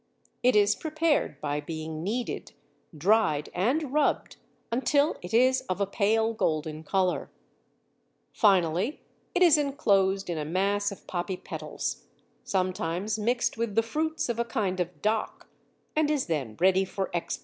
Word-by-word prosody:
It 250 -1 +4
is 205 0 +5
prepared 315 -1 0
by 145 0 -1
being 155 +1 -5
kneaded, 235 +6 -3 0.4
dried, 180 -4 +2
and 260 - 0
rubbed 300 -1 +1 0.3
until 285 +5 +2
it 180 - -8
is 255 +3 +4
of 185 - -1
a 200 - +2
pale 220 +3 +1
golden 155 -6 -1
colour. 185 +2 0 1.0
Finally, 190 - +2 0.4
it 365 - +5
is 320 -4 +6
enclosed 195 -9 +2
in 170 -3 -2
a - - -2
mass 200 +6 0
of 200 - -11
poppy 180 +1 -3
petals, - - -5 0.4
sometimes 185 +2 -1
mixed 240 +3 0
with 230 -3 -2
the 225 - +4
fruits 315 +7 -2
of 235 -1 -2
a - - +3
kind 200 -5 -2
of 175 -3 -4
dock, 215 +1 -1 0.5
and 305 -1 +2
is 295 -3 +1
then 140 -10 -3
ready 190 +2 +4
for 190 0 -4
export. 170 - -2
200 Hz, 150 wpm, -28 LUFS, 180-240 Hz, 1.0 s, is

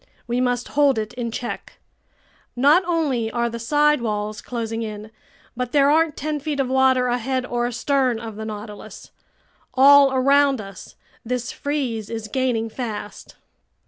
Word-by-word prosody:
We 240 +1 -1
must 245 -1 -1
hold 285 -3 +3
it 215 +1 -3
in 240 -2 -4
check. 240 +2 -6 0.8
Not 290 +9 +5
only 285 -10 0
are 235 +1 -1
the 235 - -5
side 295 +3 +2
walls 210 -2 -3
closing 230 -2 -4
in, 215 -1 -6 0.4
but 250 0 -4
there 285 -1 +5
aren't 320 0 +2
ten 305 +1 -2
feet 295 0 -3
of 265 -2 0
water 260 -1 +3
ahead 250 +1 -1
or 240 -1 -1
astern 255 -1 0
of 225 -2 -7
the 220 - -6
Nautilus. 210 -1 -9 0.6
All 280 +1 +7
around 275 0 +3
us, 195 -3 -10 0.3
this 245 0 -3
freeze 255 -8 -3
is 225 -1 -5
gaining 245 -2 0
fast." 220 -3 -7
245 Hz, 150 wpm, -22 LUFS, 225-275 Hz, 0.8 s, All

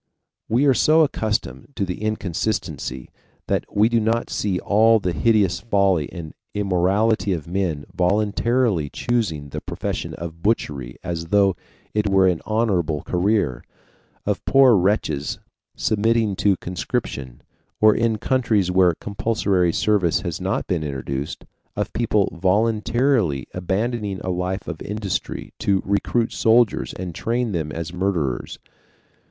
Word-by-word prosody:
We 125 +6 +3
are 135 - +5
so 155 +5 +4
accustomed 110 - -2
to 100 - -1
the 90 +1 -5
inconsistency 90 - -3 0.4
that - - 0
we 105 +2 +4
do 115 0 +2
not 115 +2 0
see 100 -3 -1
all 110 +4 +4
the 90 -3 -1
hideous 100 -4 +2
folly 100 -7 +1
and 85 -4 -8 0.2
immorality 100 +2 +1
of 80 -5 -4
men 85 -5 -2
voluntarily 105 - +1
choosing 85 -13 -2
the - - -5
profession - - -4
of 85 0 -8
butchery 70 - -1
as 85 -1 -4
though 100 0 +3 0.4
it 105 -1 +1
were 95 -1 +4
an 90 -3 +1
honorable 95 -9 0
career, 90 - 0 0.6
of - - -1
poor 135 -4 +6
wretches 90 -7 0 0.4
submitting 110 -1 +1
to 100 -3 +2
conscription, 70 -8 -4 0.4
or 110 0 +6
in 115 -1 +1
countries 110 -7 +1
where 90 -2 +4
compulsory 100 -3 0
service 95 -3 +2
has 85 -2 -4
not 95 +1 -1
been 85 -5 -1
introduced, 70 0 -4 0.3
of - - -3
people 105 -4 +1
voluntarily 105 - +1
abandoning 100 +2 -2
a 95 - -2
life 90 +2 -3
of 80 -3 -6
industry 100 -3 -4
to 95 -2 +1
recruit 115 +4 0
soldiers 115 -1 +3
and 90 -2 -6
train 120 +5 -1
them 80 -5 -2
as 85 +2 -5
murderers. 90 -8 -2
95 Hz, 135 wpm, -22 LUFS, 85-110 Hz, 0.6 s, poor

